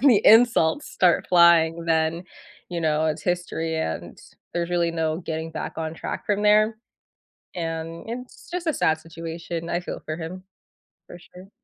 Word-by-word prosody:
the 240 -6 +5
insults 225 - +5
start 180 -2 +2
flying, 170 -1 +5
then, 160 +1 +1 0.5
you 175 -1 -3
know, 155 0 +1
it's 155 0 -2
history, 175 -2 -2
and 80 - -4 0.4
there's 170 0 -1
really 170 -1 +1
no 160 -1 -1
getting 160 -2 -4
back - - -5
on 160 -1 -3
track - - -5
from 205 0 0
there, 215 +1 +4 0.8
and 165 -1 -4
it's 250 +2 -8
just 355 -1 -4
a 320 - +2
sad 160 0 +2
situation. 165 +1 -6
I 175 - -1
feel - - -6
for 155 - -4
him, 175 +3 -7 0.6
for 175 - -11
sure. 180 +2 -15
170 Hz, 160 wpm, -24 LUFS, 160-185 Hz, 0.8 s, the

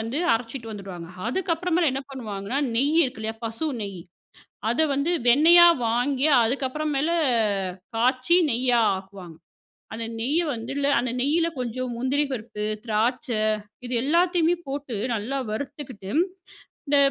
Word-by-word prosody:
வந்து 230 +7 -2
அரைச்சிட்டு 230 0 -3
வந்துடுவாங்க. 190 -5 -8 0.2
அதுக்கப்புறமேல் 345 +1 0
என்ன 270 +1 -3
பண்ணுவாங்கன்னா, 220 -1 -4 0.2
நெய் 285 +7 +2
இருக்கு 250 -3 -5
இல்லையா, 220 +1 -3
பசு 230 +8 -2
நெய், 195 -3 -5 0.7
அதை 315 +7 +3
வந்து 280 +5 0 0.2
வெண்ணெயா 335 +7 +8 0.2
வாங்கி 255 +5 +1 0.2
அதுக்கப்புற 265 +5 -1
மேல 285 +4 +1 0.9
காய்ச்சி 255 +8 +3
நெய்யா 245 0 +2 0.2
ஆக்குவாங்க. 190 -4 -10 0.6
அந்த 225 0 -4
நெய்யை 295 +9 +1
வந்து 230 +3 -6
இல்ல 280 0 +1
அந்த 240 -1 -2
நெய்யில 325 +5 +2
கொஞ்சம் 250 0 -3
முந்திரி 270 +4 +1
பருப்பு, 215 -2 -5 0.2
திராட்சை 230 +2 0 0.4
இது 245 - -4
எல்லாத்தையுமே 340 +2 +2
போட்டு, 275 -3 -4 0.2
நல்லா 235 +6 -3
வறுத்துகிட்டு, 245 -4 -6 0.8
இந்த 285 - +3
255 Hz, 125 wpm, -24 LUFS, 225-290 Hz, 0.9 s, வெண்ணெயா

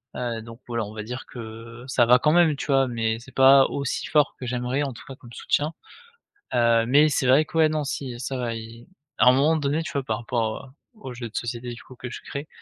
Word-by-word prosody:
Heu, 115 -2 -3
donc, 115 +1 -11
voilà 115 -2 -2
on 105 - -10
va 110 - -6
dire 125 +4 -7
que, 125 - -11
heu, 115 +2 -9
ça 125 -2 +3
va 125 +2 +6
quand 150 - +3
même, 165 -2 +4
tu 135 - -6
vois? 135 -2 +3
Mais 115 -2 -1
c'est 120 +3 -14
pas 135 0 +7
aussi 140 -2 -3
fort 150 -2 +2
que 130 - -6
j'aimerais, 125 +3 -1
en 135 -2 -3
tout 115 - -12
cas, 135 - -8
comme 120 -2 -15
soutien, 150 +6 -1 0.8
heu, 115 -1 +3
mais 145 +5 +5
c'est 140 - 0
vrai 135 +5 +5
que 165 - -6
ouais, 160 -1 +5
non, 155 -1 -1
si, 135 -4 -5
ça 130 +1 -4
va, 120 -2 -2
il 115 +1 -9 0.3
à - - +4
un - - +10
moment 145 +5 +3
donné, 145 +1 0
tu 160 - -6
vois? 140 - -1
Par 110 -4 -2
rapport, 115 +1 -2
heu, - - -15 0.3
aux 130 - -7
jeux 120 -1 -6
de 110 - -21
société, 120 +1 -4
du 120 - -11
coup, 130 - -14
que 125 0 -7
je - - -8
créé, 140 +2 -7
125 Hz, 260 wpm, -24 LUFS, 115-140 Hz, 0.8 s, un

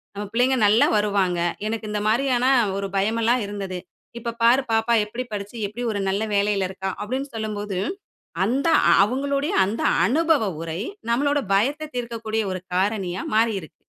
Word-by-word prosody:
நம்ம 205 +1 -4
பிள்ளைங்க 255 +3 +3
நல்லா 215 +3 +5
வருவாங்க. 200 -4 +1 0.3
எனக்கு 220 0 -3
இந்த 210 0 -1
மாதிரியான 250 +1 +2 0.3
ஒரு 200 0 -3
பயம் 215 +4 +1
எல்லாம் 240 +1 +2
இருந்தது. 195 -3 -5 0.4
இப்ப 235 0 -4
பார், 240 +4 +6
பாப்பா 225 +1 +2
எப்படி 235 +4 -5
படிச்சு, 205 +2 -5
எப்படி 235 +5 -6
ஒரு 200 - -2
நல்ல 200 +3 0
வேலையில 200 -1 +1
இருக்கா?" 190 0 -4
அப்டீன்னு 260 +5 -4
சொல்லும்போது, 210 -3 -3 0.7
அந்த 260 +9 +1 0.3
அவங்களுடைய 275 +6 0
அந்த 205 +4 -3 0.2
அனுபவ 320 +2 +2 0.2
உரை, 165 +1 -4 0.3
நம்பளோட 285 +4 +2 0.2
பயத்த 285 +10 +1
தீர்க்கக்கூடிய 230 -2 -2
ஒரு 185 - -4
காரணியா 190 -1 0
மாறி 225 +1 +3
இருக்கு. 155 - -15
220 Hz, 150 wpm, -23 LUFS, 200-245 Hz, 0.7 s, பார்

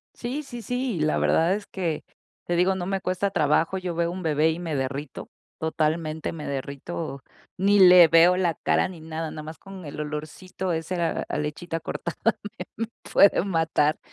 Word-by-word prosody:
Sí, 260 +5 -4
sí, 240 -4 -8
sí, 245 -2 -2
la 155 0 +1
verdad 170 +4 +3
es 205 0 -6
que, 170 -5 -3 0.4
te 175 - 0
digo, 180 +2 +3
no 180 -2 -3
me 195 0 -2
cuesta 185 +2 -1
trabajo. 165 +4 +2
Yo 180 -2 -4
veo 170 0 0
un 185 +1 -5
bebé 160 -1 +2
y 160 - -4
me 165 -4 -3
derrito, 135 +1 -4 0.3
totalmente, 160 0 -1
me 155 -2 -7
derrito, 140 +1 -5 0.3
ni 200 +2 +4
le 180 -2 +9
veo 170 +3 +6
la 175 -3 +2
cara - - +1
ni 175 -3 -10
nada. 160 0 -5
Nada 155 - -7
más 155 +1 -8
con 195 -1 -11
el 145 - -7
olorcito 155 +5 -4
ese 170 +2 -2
a 165 -1 -1
a - - -3
lechita 160 +3 -3
cortada, 170 +1 -5
me 225 - +5 0.7
me - - -12
puede 200 -2 +6
matar 160 -4 +1
170 Hz, 185 wpm, -25 LUFS, 155-185 Hz, 0.7 s, le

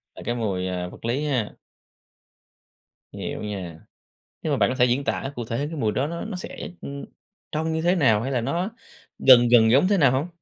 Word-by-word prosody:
là - - -10
cái 120 - -1
mùi 100 -6 -2 0.3
vật - - -11
lý 130 +6 -1
ha. 125 -8 -1 1.6
Hiểu - - -5
nha, 90 -6 -6 0.6
nhưng 155 - -1
mà 140 - +1
bạn 100 - +3
có 130 - -2
thể 125 -1 +4
diễn 125 +3 +1
tả 135 0 -2
cụ 120 -2 -4
thể 115 +1 -3
cái 150 +3 -3
mùi 110 -6 +1
đó 135 +6 -1
nó 170 +1 -5
nó 215 -4 -5
sẽ, 180 - -7
ưm, 140 0 -7 0.5
trông 160 +1 -1
như 160 - -1
thế 175 +2 +2
nào 110 - +3
hay 135 +3 -3
là 125 - 0
nó 175 - -1 0.5
gần 120 -2 +7
gần 110 -2 +6
giống 140 +8 +5
thế 200 -1 +3
nào 135 -6 +5
hông? 135 +5 0
130 Hz, 215 wpm, -24 LUFS, 115-155 Hz, 1.6 s, gần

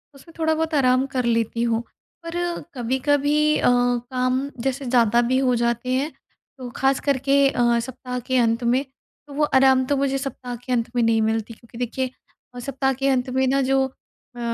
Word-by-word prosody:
उसमें 300 +5 -16
थोड़ा-बहुत 320 0 0
आराम 255 -1 +3
कर 255 -2 0
लेती 230 0 0
हूँ। 230 -1 +1 0.4
पर 335 +1 -6 0.4
कभी-कभी 290 +5 +1
अ, - - +1
काम 250 +2 +1
जैसे 270 +1 -2
ज़्यादा 240 -2 +3
भी 260 - +2
हो 255 -2 +2
जाते 235 +1 -1
हैं, 280 +4 0 0.5
तो 255 -2 -7
खासकर 270 +1 +1
के 275 0 +5
अ, 240 -2 +2
सप्ताह 250 +1 -5
के 255 +2 -1
अंत 230 0 +2
में, 245 +3 +2 0.4
तो 285 - -11
वो 300 +2 0
आराम 265 -2 +4
तो 285 +1 0
मुझे 275 0 0
सप्ताह 255 -2 -5
के 255 - -5
अंत 230 -2 0
में 240 - +2
नहीं 225 -1 +3
मिलती 220 +1 -1
क्योंकि 230 +1 -16
देखिए 250 +2 -2 0.5
अ, - - -6
सप्ताह 270 +1 -1
के 270 +2 -2
अंत 255 -1 0
में 265 +1 +1
ना, 275 +1 +2
जो 265 0 +2
अ, 250 -1 -20
255 Hz, 185 wpm, -22 LUFS, 240-275 Hz, 0.5 s, के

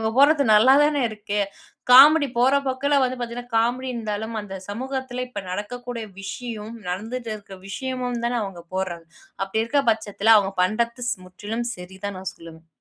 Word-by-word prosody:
இவங்க 220 - 0
போடறது 285 +1 +6
நல்லாதானே 275 +6 +5
இருக்கு. 210 -1 -4 0.5
காமெடி 285 +2 +9
போற 255 +3 +4
போக்குல 280 +2 +1
வந்து 255 0 -2
பார்த்தீங்கன்னா 240 0 -6
காமெடி 245 +3 +1
இருந்தாலும் 220 -1 -4
அந்த 195 -2 -8
சமூகத்தில 255 +3 -4
இப்ப 205 -5 -6
நடக்கக்கூடிய 235 +4 -5 0.2
விஷயம் 220 +2 -6
நடந்துட்டு 225 +6 -4
இருக்க 200 -2 -12
விஷயமும் 250 +2 -3
தான 245 0 0
அவங்க 190 -4 -7
போடுறாங்க? 175 -3 -3 0.4
அப்படி 205 +3 -1
இருக்க 280 +5 +1
பட்சத்தில 220 0 +3
அவங்க 195 -2 +2
பண்ணுறது 235 +5 0 0.2
முற்றிலும் 210 +6 -5
சரிதான் 190 +2 -7
நான் 190 0 -5
சொல்லுவேன். 165 0 -13
230 Hz, 145 wpm, -23 LUFS, 205-255 Hz, 0.5 s, காமெடி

